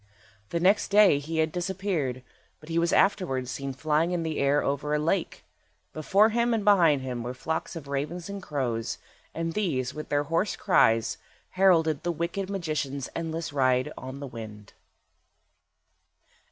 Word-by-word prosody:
The 170 - -1
next 195 +5 +3
day 200 -7 +5
he 160 +3 -5
had 160 0 +2
disappeared, 175 -8 -2 0.4
but 155 - -15
he 165 0 +1
was 170 0 +1
afterwards 135 -11 +1
seen 140 0 -4
flying 155 +4 0
in 170 -2 -1
the 160 -2 -3
air 140 +1 +2
over 145 +2 -1
a - - +2
lake. 165 +4 -1 0.5
Before 195 +8 +3
him 235 +1 +1
and 210 -3 -2
behind 165 -9 +5
him 125 -2 -4
were 125 +2 -5
flocks 160 +6 -3
of 155 -4 -8
ravens 150 +5 -3
and 200 0 -6
crows, 125 -9 -2 0.4
and 165 0 -2
these, 140 -12 -1
with 155 0 -7
their 145 0 +1
hoarse 165 +7 0
cries, 115 - +2 0.3
heralded 165 -6 +3
the 175 - -1
wicked 170 +4 -3
magician's 155 -8 -3
endless 165 -2 -4
ride 130 -2 +2
on 130 +1 -8
the 140 - -6
wind. 110 -4 -10
155 Hz, 160 wpm, -27 LUFS, 135-180 Hz, 0.5 s, day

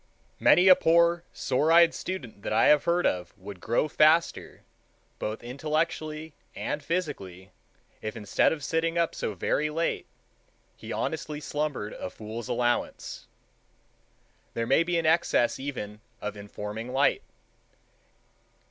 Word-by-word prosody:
Many 180 +2 +6
a 185 - +10
poor 170 +1 +3
sore 145 +5 0
eyed 170 0 +7
student 130 - -6
that - - -4
I 110 +1 +4
have 150 -1 +5
heard 175 +1 +2
of 90 +1 -1
would 100 -1 -10
grow 120 +7 +1
faster, 155 +2 +2 0.6
both 110 +2 -4
intellectually 155 +3 -2 0.2
and 150 - -3
physically, 140 - -4 0.5
if, 110 +2 -5
instead 105 -2 +2
of 150 -3 -4
sitting 165 +4 0
up 170 -1 +1
so 105 - -3
very 150 - 0
late, 165 +2 -2 0.7
he - - -9
honestly 155 -2 -3
slumbered 145 -8 -3
a - - -6
fool's 110 +2 -7
allowance. 120 0 -1 1.3
There 115 - -1
may 135 +7 +4
be 170 0 0
an 165 - 0
excess 155 -6 +2
even 110 -7 -6 0.2
of 105 0 -5
informing 105 +3 -6
light. 135 +2 +3
145 Hz, 130 wpm, -27 LUFS, 110-165 Hz, 1.3 s, a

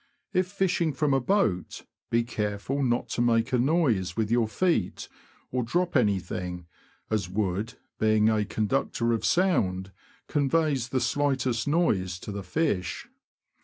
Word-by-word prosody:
If 185 0 +2
fishing 180 -5 0
from 140 0 +1
a 135 - +4
boat, 120 - 0 0.2
be 115 0 +2
careful 105 +4 -2
not 120 -3 +1
to - - -1
make 115 +1 +2
a 125 - +3
noise 120 - +1
with 110 -1 0
your 120 -2 +3
feet, 175 +10 0 0.4
or 125 - 0
drop 175 +9 -1
anything, 90 -6 0 0.5
as 100 -5 0
wood, 105 +4 -2 0.2
being 110 0 +3
a 110 -1 +2
conductor 115 +2 0
of 115 - -1
sound, 95 - +1 0.4
conveys 145 -3 +1
the 130 -1 0
slightest 130 -2 0
noise 105 - +1
to - - -6
the 100 0 -4
fish. 90 - -2
120 Hz, 140 wpm, -27 LUFS, 105-145 Hz, 0.5 s, a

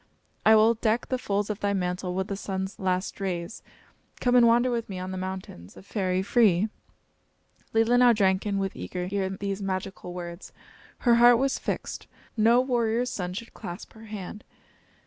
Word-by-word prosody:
I 220 - +8
will 220 +2 +6
deck 225 +1 0
the 255 - -1
folds 205 -2 -1
of 210 - -5
thy 205 0 0
mantle 180 -1 -2
with 190 0 0
the 200 - -3
sun's 190 0 -4
last 185 +1 -1
rays. 180 0 -3 0.6
Come 245 - +1
and 240 -1 +7
wander 240 +2 +4
with 230 -2 -2
me 190 - -5
on 185 +1 -5
the - - -4
mountains, 185 - -7
a - - -12
fairy 190 -2 -1
free!" 210 -2 +3 1.0
Leelinau 240 +2 +5
drank 190 -1 +2
in 200 -1 0
with 195 -1 -2
eager 180 -1 -5
ear 195 -2 0
these 195 +1 -4
magical 190 -1 -4
words. 175 0 -8 0.5
Her 235 -1 +6
heart 240 0 +8
was 270 +2 0
fixed. - - -4 0.3
No 230 +2 +5
warrior's 245 -1 0
son 180 -1 -4
should 230 +3 -7
clasp 175 -4 -8
her 220 0 -13
hand. 210 0 -7
200 Hz, 175 wpm, -27 LUFS, 185-230 Hz, 1.0 s, I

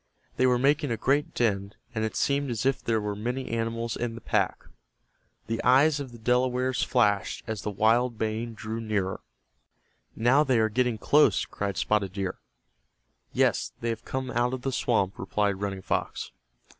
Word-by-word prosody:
They 130 - +4
were 125 -1 +4
making 140 +3 +2
a 115 - -1
great 140 +5 +1
din, 100 -4 0 0.2
and 110 -2 -1
it 110 - -2
seemed 140 0 +1
as 115 0 -2
if 135 -1 +1
there 115 -1 +1
were 105 -1 -3
many 125 +5 -3
animals 115 0 -2
in 120 -1 -3
the - - -7
pack. - - 0 0.8
The 115 0 -3
eyes 145 +4 +5
of 135 -3 -6
the 120 - -11
Delawares 125 +2 +1
flashed 105 -5 +1
as 110 -2 -4
the - - -3
wild 115 +4 +2
baying 110 +1 -2
drew 110 +1 -5
nearer. 100 -4 -2 0.9
"Now 130 +6 +4
they 130 -4 +2
are 110 -1 +3
getting 125 +1 +1
close," 150 +7 +4
cried 100 -3 -4
Spotted 100 -3 +1
Deer. 95 -1 -3 0.9
"Yes, - - +1
they 115 - -1
have 115 0 -3
come 130 -1 -4
out 120 +2 +1
of 125 - -9
the 135 - -1
swamp," 110 -6 0
replied 100 -2 -1
Running 100 -2 -3
Fox. - - -2
115 Hz, 175 wpm, -27 LUFS, 105-125 Hz, 0.9 s, eyes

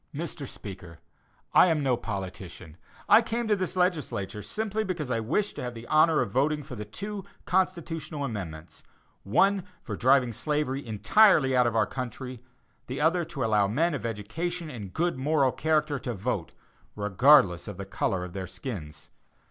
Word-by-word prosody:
Mr. 150 -3 -4
Speaker: 90 -7 -8 0.6
I - - +7
am 160 -4 +1
no 130 -2 +3
politician, 95 -6 -7 0.3
I 210 +3 +8
came 235 0 -2
to 210 - +3
this 185 -1 -3
legislature 150 - -1
simply 215 - -2
because 170 -9 -3
I 115 - +1
wished 160 - -1
to - - -4
have 125 -1 -5
the 115 +1 -9
honor 155 +3 +4
of - - -2
voting 150 +5 +1
for 140 -1 -10
the 105 -3 -6
two 200 - -6 0.2
constitutional 165 -5 -1
amendments 80 - -7 0.4
one 195 - +3 0.2
for - - -5
driving 130 -1 +3
slavery 145 +2 -1
entirely 135 - +4
out 125 -1 +4
of 115 - -1
our 110 -1 +4
country; 125 -1 -6 0.5
the 130 +2 -4
other 170 +3 +3
to 150 -7 -3
allow 105 -3 +3
men 160 - +1
of - - -4
education 155 - -4
and 105 -7 -7
good 170 - -1
moral 140 -1 +2
character 150 -2 0
to 120 -2 -4
vote, 95 -4 -3 0.4
regardless 105 - +4
of - - -7
the 100 - -5
color 95 -1 -1
of 90 -1 -8
their 95 -1 -5
skins. 85 - -7
130 Hz, 170 wpm, -27 LUFS, 105-165 Hz, 0.6 s, I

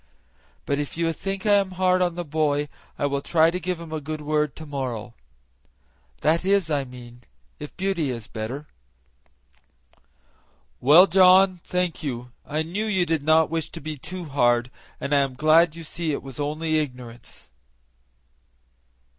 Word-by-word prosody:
But 140 0 -1
if 145 +2 -4
you 165 -1 0
think 195 +4 -5
I 210 - +4
am 195 -2 -1
hard 185 0 +3
on 175 -2 +1
the 175 0 -4
boy 150 -1 0 0.3
I - - -1
will 140 0 -1
try 160 +2 +3
to 180 - -3
give 180 0 -3
him 165 -2 -9
a 155 -1 -3
good 155 +2 -5
word 150 -1 -1
to 160 - -9
morrow 125 -5 -5 1.1
that 160 +3 +2
is, 195 -4 +2
I 140 -2 0
mean 120 -1 -12 0.4
if 150 - -9
Beauty 190 -6 -1
is 115 -4 -5
better." 120 +6 -6 2.1
"Well, 150 +8 +8
John, 185 0 +5
thank 180 -2 -2
you. 125 -4 -5 0.2
I 155 +2 -1
knew 185 +7 -3
you 190 -5 +1
did 160 -3 0
not 155 +1 +3
wish 165 -1 -2
to 165 - -8
be 155 0 -5
too 175 +6 -7
hard, 120 -4 +1 0.3
and 140 - -2
I 145 - +5
am 135 -2 -1
glad 155 +3 +4
you 165 - -8
see 160 +1 -3
it 140 - -3
was 135 0 -9
only 155 +2 0
ignorance." 125 -5 -8
155 Hz, 165 wpm, -24 LUFS, 140-175 Hz, 2.1 s, Well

